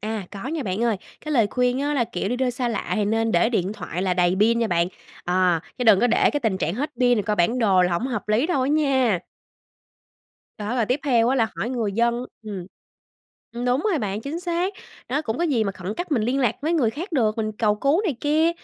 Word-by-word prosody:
À, 215 Hz, -3 st, -4 dB
có 200 Hz, +5 st, -7 dB
nha 315 Hz, -2 st, -2 dB
bạn 200 Hz, +3 st, -2 dB
ơi, 225 Hz, -4 st, +1 dB, 0.2 s
cái 305 Hz, -, -4 dB
lời 230 Hz, -6 st, +4 dB
khuyên 250 Hz, +3 st, 0 dB
á, 290 Hz, +1 st, 0 dB
là, 245 Hz, -4 st, +2 dB
kiểu, 195 Hz, -1 st, -3 dB
đi 245 Hz, -, -1 dB
đâu 255 Hz, 0 st, +1 dB
xa 245 Hz, 0 st, -2 dB
lạ 230 Hz, -, -3 dB
thì 210 Hz, -2 st, +1 dB
nên 225 Hz, +1 st, 0 dB
để 175 Hz, +6 st, +3 dB
điện 195 Hz, -4 st, 0 dB
thoại 185 Hz, -4 st, -5 dB
là 185 Hz, -2 st, +1 dB
đầy 180 Hz, 0 st, +2 dB
pin 230 Hz, +2 st, +4 dB
nha 230 Hz, -, +1 dB
bạn. 175 Hz, -3 st, +1 dB, 0.4 s
Ờ, 180 Hz, -2 st, +2 dB, 0.2 s
chứ 250 Hz, -, -1 dB
đừng 210 Hz, -4 st, +6 dB
có 245 Hz, -, +4 dB
để 230 Hz, -, +3 dB
cái 290 Hz, -, -2 dB
tình 215 Hz, -6 st, 0 dB
trạng 165 Hz, +3 st, -1 dB
hết 290 Hz, +6 st, -2 dB
pin 245 Hz, -1 st, +5 dB
rồi -, -, 0 dB
coi 210 Hz, +1 st, -1 dB
bản 205 Hz, +8 st, +2 dB
đồ 195 Hz, -6 st, +4 dB
là 180 Hz, -1 st, +1 dB
hổng 200 Hz, +10 st, 0 dB
hợp 230 Hz, -5 st, -4 dB
lý 225 Hz, +8 st, +2 dB
đâu 280 Hz, -8 st, +1 dB
á 265 Hz, -, 0 dB
nha. 265 Hz, -, +2 dB, 1.4 s
Đó, 215 Hz, +3 st, -3 dB
rồi 230 Hz, -, +1 dB
tiếp 255 Hz, +5 st, 0 dB
theo 240 Hz, -4 st, +3 dB
á 265 Hz, -, +2 dB
là 225 Hz, -3 st, +2 dB
hỏi 240 Hz, -, -2 dB
người 225 Hz, -6 st, -1 dB
dân 235 Hz, +3 st, +1 dB, 0.2 s
ừm, 200 Hz, -5 st, -6 dB, 0.9 s
ừm, 240 Hz, +1 st, -4 dB
đúng 250 Hz, +2 st, +2 dB
rồi 325 Hz, -, +1 dB
bạn, 205 Hz, -2 st, -3 dB
chính 300 Hz, +7 st, -5 dB
xác, 355 Hz, +2 st, -1 dB, 0.4 s
đó, 285 Hz, +5 st, 0 dB
cũng 225 Hz, -1 st, -3 dB
có 345 Hz, -, +1 dB
gì 260 Hz, -9 st, +1 dB
mà 200 Hz, -, -2 dB
khẩn 185 Hz, +2 st, -6 dB
cấp 350 Hz, +1 st, -4 dB
mình 235 Hz, -, +2 dB
liên 255 Hz, +5 st, 0 dB
lạc 230 Hz, -3 st, +1 dB
với 320 Hz, -, 0 dB
người 265 Hz, -10 st, +2 dB
khác 340 Hz, -, -7 dB
được, 220 Hz, -7 st, +1 dB
mình 215 Hz, -1 st, -1 dB
cầu 210 Hz, -1 st, +1 dB
cứu 280 Hz, -, +1 dB
này 330 Hz, -, -1 dB
kia. 310 Hz, +3 st, +3 dB
235 Hz, 260 wpm, -23 LUFS, 205-270 Hz, 1.4 s, đừng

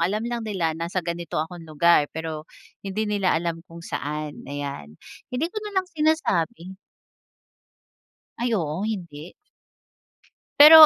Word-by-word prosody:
alam 210 Hz, +5 st, 0 dB
lang 240 Hz, 0 st, -1 dB
nila, 190 Hz, -7 st, 0 dB
nasa 170 Hz, +2 st, -2 dB
ganito 170 Hz, -1 st, -3 dB
akong 165 Hz, +1 st, -3 dB
lugar 155 Hz, -1 st, +5 dB
pero 160 Hz, -1 st, -4 dB, 0.3 s
hindi 200 Hz, +2 st, -1 dB
nila 200 Hz, -5 st, +2 dB
alam 165 Hz, 0 st, -1 dB
kung 165 Hz, 0 st, -10 dB
saan, 150 Hz, +1 st, -3 dB
ayan. 140 Hz, -, -5 dB, 0.3 s
Hindi 250 Hz, +4 st, -1 dB
ko -, -, -12 dB
nalang 400 Hz, -3 st, 0 dB
sinasabi. 235 Hz, -, +1 dB, 1.6 s
Ay, 235 Hz, 0 st, +1 dB
oo, 165 Hz, 0 st, -1 dB
hindi. 175 Hz, -7 st, -4 dB, 1.3 s
Pero 310 Hz, +1 st, +13 dB
175 Hz, 120 wpm, -25 LUFS, 160-220 Hz, 1.6 s, Pero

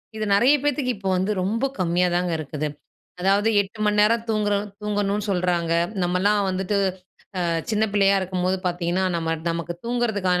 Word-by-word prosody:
இது 215 Hz, 0 st, -2 dB
நெறைய 250 Hz, +8 st, +5 dB
பேத்துக்கு 285 Hz, -3 st, 0 dB
இப்போ 195 Hz, -1 st, -3 dB
வந்து 190 Hz, +3 st, 0 dB
ரொம்ப 225 Hz, +7 st, 0 dB
கம்மியா 180 Hz, 0 st, +2 dB
தாங்க 180 Hz, -1 st, 0 dB
இருக்குது. 150 Hz, 0 st, -3 dB, 0.5 s
அதாவது 200 Hz, +3 st, +3 dB
8 205 Hz, +2 st, -10 dB
மணி 210 Hz, 0 st, +2 dB
நேரம் 230 Hz, +2 st, +3 dB
தூங்கற 210 Hz, -1 st, +1 dB, 0.3 s
தூங்கணும் 205 Hz, 0 st, -1 dB
சொல்றாங்க. 175 Hz, -3 st, 0 dB, 0.3 s
நம்மலாம் 185 Hz, +4 st, +2 dB
வந்துட்டு 190 Hz, +2 st, -1 dB, 0.7 s
அ -, -, +1 dB, 0.2 s
சின்ன 215 Hz, 0 st, +2 dB
பிள்ளையா 200 Hz, -1 st, +4 dB
இருக்கும்போது 185 Hz, 0 st, -1 dB
பாத்தீங்கன்னா, 175 Hz, +1 st, 0 dB
நம்ம 165 Hz, 0 st, -1 dB, 0.2 s
நமக்கு 170 Hz, +1 st, -3 dB
தூங்குறதற்கான 215 Hz, -7 st, 0 dB
195 Hz, 150 wpm, -23 LUFS, 180-210 Hz, 0.7 s, நெறைய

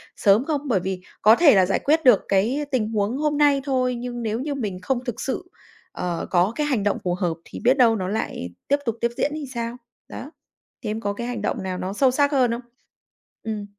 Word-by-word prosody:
sớm 210 Hz, +6 st, +3 dB
không? 295 Hz, -3 st, -1 dB
Bởi 225 Hz, -7 st, +2 dB
vì 185 Hz, 0 st, -4 dB, 0.2 s
có 220 Hz, +2 st, +7 dB
thể 290 Hz, -6 st, +6 dB
là 190 Hz, -1 st, +5 dB
giải 195 Hz, -, 0 dB
quyết 315 Hz, +3 st, +2 dB
được 245 Hz, -6 st, +7 dB
cái 230 Hz, +10 st, +1 dB
tình 230 Hz, -5 st, +1 dB
huống 215 Hz, +3 st, 0 dB
hôm 295 Hz, 0 st, 0 dB
nay 285 Hz, -2 st, +4 dB
thôi, 255 Hz, -3 st, 0 dB
nhưng 240 Hz, 0 st, -5 dB
nếu 220 Hz, +1 st, -1 dB
như 285 Hz, +2 st, -3 dB
mình 205 Hz, -9 st, -4 dB
không 245 Hz, +6 st, -1 dB
thực 245 Hz, -4 st, -4 dB
sự, 270 Hz, -, -3 dB, 0.5 s
ờ, 175 Hz, -2 st, -3 dB
có 180 Hz, +3 st, +3 dB
cái 300 Hz, -1 st, -1 dB
hành 245 Hz, -9 st, 0 dB
động 205 Hz, -, +1 dB
phù 175 Hz, -1 st, 0 dB
hợp 175 Hz, -3 st, -1 dB
thì -, -, -9 dB
biết 255 Hz, +3 st, +4 dB
đâu 230 Hz, -3 st, +5 dB
nó 185 Hz, -3 st, -3 dB
lại 195 Hz, -, -3 dB, 0.2 s
tiếp 285 Hz, -, +3 dB
tục 230 Hz, -1 st, -1 dB
tiếp 235 Hz, 0 st, +1 dB
diễn 290 Hz, -, 0 dB
thì 300 Hz, -2 st, -5 dB
sao? 235 Hz, 0 st, -3 dB, 0.3 s
Đó. 290 Hz, -, -8 dB, 0.5 s
Thế 215 Hz, -, -3 dB
em 215 Hz, +1 st, -2 dB
có 205 Hz, -2 st, -1 dB
cái 235 Hz, +3 st, -5 dB
hành 245 Hz, -3 st, -4 dB
động 210 Hz, -, -2 dB
nào 185 Hz, -1 st, -3 dB
nó 185 Hz, +2 st, -4 dB
sâu 255 Hz, +4 st, +3 dB
sắc 285 Hz, +2 st, +2 dB
hơn 255 Hz, -4 st, +3 dB
không? 235 Hz, +1 st, -3 dB, 0.8 s
Ừm. 215 Hz, -2 st, -4 dB
235 Hz, 240 wpm, -23 LUFS, 200-270 Hz, 0.8 s, có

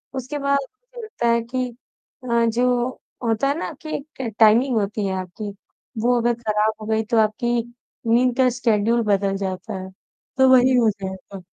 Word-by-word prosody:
उसके 265 Hz, +3 st, -4 dB
बाद 280 Hz, 0 st, +2 dB
ऐसा 485 Hz, -, -13 dB
लगता 425 Hz, -, -3 dB
है 235 Hz, 0 st, +3 dB
कि 250 Hz, +2 st, -2 dB, 0.6 s
अ, 235 Hz, -1 st, +2 dB
जो 245 Hz, +2 st, +1 dB, 0.3 s
होता 230 Hz, +3 st, +1 dB
है 285 Hz, -, 0 dB
ना -, -, -4 dB
कि 310 Hz, -1 st, -4 dB
एक 285 Hz, -, -11 dB
ट 230 Hz, -4 st, -4 dB
टाइमिंग 235 Hz, +4 st, +5 dB
होती 210 Hz, 0 st, -1 dB
है 190 Hz, -, -2 dB
आपकी। 195 Hz, +3 st, -7 dB, 0.5 s
वो 245 Hz, +2 st, +3 dB
अगर 240 Hz, +1 st, +2 dB
ख़राब 215 Hz, -1 st, +1 dB
हो -, -, -6 dB
गई 220 Hz, 0 st, +1 dB
तो 230 Hz, -, +3 dB
आपकी 220 Hz, +3 st, +1 dB, 0.5 s
नींद 240 Hz, +2 st, +3 dB
का 260 Hz, -1 st, +4 dB
शेड्यूल 235 Hz, -1 st, +1 dB
बदल 200 Hz, -2 st, +1 dB
जाता 195 Hz, +3 st, -4 dB
है। 190 Hz, -, -8 dB, 0.5 s
तो 265 Hz, 0 st, +5 dB
वही 255 Hz, 0 st, +6 dB
हो 230 Hz, -2 st, +4 dB
जाएगा। 190 Hz, 0 st, -8 dB
235 Hz, 180 wpm, -22 LUFS, 215-255 Hz, 0.6 s, वही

